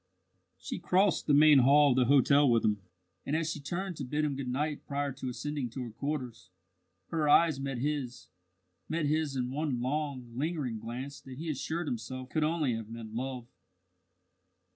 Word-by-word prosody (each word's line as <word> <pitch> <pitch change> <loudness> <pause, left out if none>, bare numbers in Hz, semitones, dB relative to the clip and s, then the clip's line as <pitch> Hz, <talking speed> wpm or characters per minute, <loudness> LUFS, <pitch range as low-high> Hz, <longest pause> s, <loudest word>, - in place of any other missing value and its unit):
She - - -5
crossed 190 0 +2
the 145 - +4
main 150 -1 +7
hall 140 +3 +6
of - - +2
the 130 -1 +4
hotel 140 +2 +5
with 115 -2 +3
him, 105 -2 +1 0.4
and 145 - -1
as 165 0 0
she 155 - -5
turned 180 +4 -4
to 145 - -4
bid 150 +4 -1
him 145 -2 -1
good 135 -1 -4
night 145 +4 -2
prior 140 0 -1
to 130 0 -5
ascending 145 0 -3
to 125 +2 -5
her 120 - -7
quarters, 130 -3 -5 0.6
her 155 -3 0
eyes 160 -2 +5
met 135 -1 -3
his 135 -2 -3 0.6
met 160 -1 0
his 150 -1 0
in 125 -1 -2
one 140 -3 -1
long, 130 -2 -3
lingering 140 -5 -2
glance 125 +5 -6
that 130 -1 -10
he 160 +2 -3
assured 160 +4 -3
himself 130 0 -5
could 155 - 0
only 155 -5 +1
have 110 -1 -5
meant 115 -1 -8
love. 125 0 -4
140 Hz, 185 wpm, -30 LUFS, 125-150 Hz, 0.6 s, main